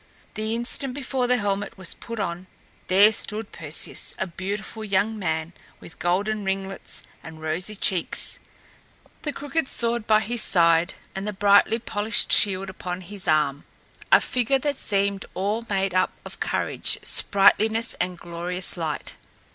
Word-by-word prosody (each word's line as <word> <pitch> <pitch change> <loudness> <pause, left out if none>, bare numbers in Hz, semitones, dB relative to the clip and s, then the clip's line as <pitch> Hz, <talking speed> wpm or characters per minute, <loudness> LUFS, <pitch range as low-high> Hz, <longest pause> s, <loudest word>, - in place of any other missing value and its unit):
The 220 +1 -2
instant 250 +2 0
before 265 -2 -1
the 250 0 +3
helmet 205 -2 -2
was 185 -3 -2
put 230 -1 -7
on, 180 -1 -3 0.4
there 200 +3 +6
stood 215 0 -2
Perseus, 160 -1 -2
a - - -1
beautiful 200 +5 -5
young 210 +2 0
man, 160 -2 -2 0.3
with 165 - -13
golden 205 +4 0
ringlets 195 0 -3 0.2
and 160 -1 -10
rosy 165 +7 -2
cheeks, 185 -3 +1 0.8
the 295 - -3
crooked 290 +1 -2
sword 235 -2 +1
by 215 -1 +5
his 235 +1 -1
side 170 0 +3 0.2
and 195 +2 -5
the 210 - -2
brightly 205 +3 +4
polished 220 -1 +1
shield 195 -2 +5
upon 185 -1 -5
his 195 +1 -8
arm 150 -2 +2 0.5
a - - +8
figure 250 +2 +1
that 285 +1 -1
seemed 200 -3 +1
all 210 +4 -1
made 195 -2 0
up 185 - +2
of - - -9
courage, - - 0
sprightliness 220 +3 +3
and 180 0 -2
glorious 175 +2 -3
light. 160 -3 -4
200 Hz, 145 wpm, -24 LUFS, 180-220 Hz, 0.8 s, a